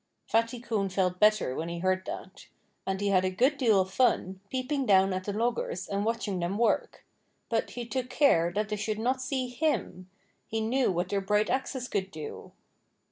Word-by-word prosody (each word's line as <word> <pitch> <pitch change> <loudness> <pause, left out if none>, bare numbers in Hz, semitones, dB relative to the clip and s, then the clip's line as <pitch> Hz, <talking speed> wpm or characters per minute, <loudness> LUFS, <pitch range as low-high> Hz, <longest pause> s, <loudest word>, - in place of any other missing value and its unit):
Fatty 230 +2 +1
Coon 220 -5 -1
felt 185 -1 0
better 210 -10 +4
when 165 +1 -3
he 170 - -4
heard 185 +1 0
that. 190 - -8 0.4
And 190 0 -1
he 205 0 0
had 185 -2 +3
a 185 - +1
good 255 +10 +2
deal 230 -8 +3
of 190 0 -1
fun, 190 -7 +2
peeping 265 +1 -1
down 195 -1 +5
at 185 0 -3
the 205 - -2
loggers 220 -4 -1
and 200 0 -1
watching 220 -4 -1
them 175 +3 -1
work. 235 +1 0 0.4
But 225 -1 0
he 240 -1 -6
took 250 +1 -3
care 175 - +3
that 210 +2 -1
they 210 - -2
should 215 +1 -2
not 255 +4 0
see 260 -1 -1
HIM. 245 - -2 0.4
He 225 - -2
knew 240 +2 +1
what 180 +1 -1
their 200 -1 0
bright 210 +2 +1
axes 260 -1 -2
could 195 -4 -2
do. 155 -4 -8
210 Hz, 195 wpm, -29 LUFS, 190-245 Hz, 0.4 s, down